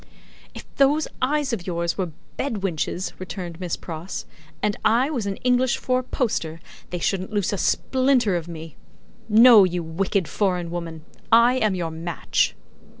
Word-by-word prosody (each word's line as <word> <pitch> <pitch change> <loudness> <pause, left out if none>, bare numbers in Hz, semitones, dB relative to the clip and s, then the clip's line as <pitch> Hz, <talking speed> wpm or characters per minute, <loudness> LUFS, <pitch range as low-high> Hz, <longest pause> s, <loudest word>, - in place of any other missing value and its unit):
"If - - -9
those 290 +3 +3
eyes 280 0 +1
of 190 -6 -4
yours 170 -1 -1
were 185 -3 -2 0.3
bed 225 -8 -3
winches," 180 0 -2
returned 180 -2 -6
Miss 180 -3 -3
Pross, 165 +2 -6 0.4
"and 210 -1 +1
I 245 +6 +3
was 235 -9 -2
an 195 - -2
English 250 0 +2
four 255 0 0
poster, 205 - -2 0.3
they 180 - -3
shouldn't 190 +3 -1
loose 205 -2 0
a - - -1
splinter 255 -6 +2
of 170 -1 -3
me. 165 -2 -9 0.5
No, 225 -1 +8
you 180 -2 0
wicked 185 +2 -1
foreign 180 -4 -1
woman; 165 -2 -6 0.3
I 235 +3 +6
am 215 -6 +1
your 170 -3 -3
match." 165 +1 -1
195 Hz, 155 wpm, -23 LUFS, 170-245 Hz, 0.5 s, No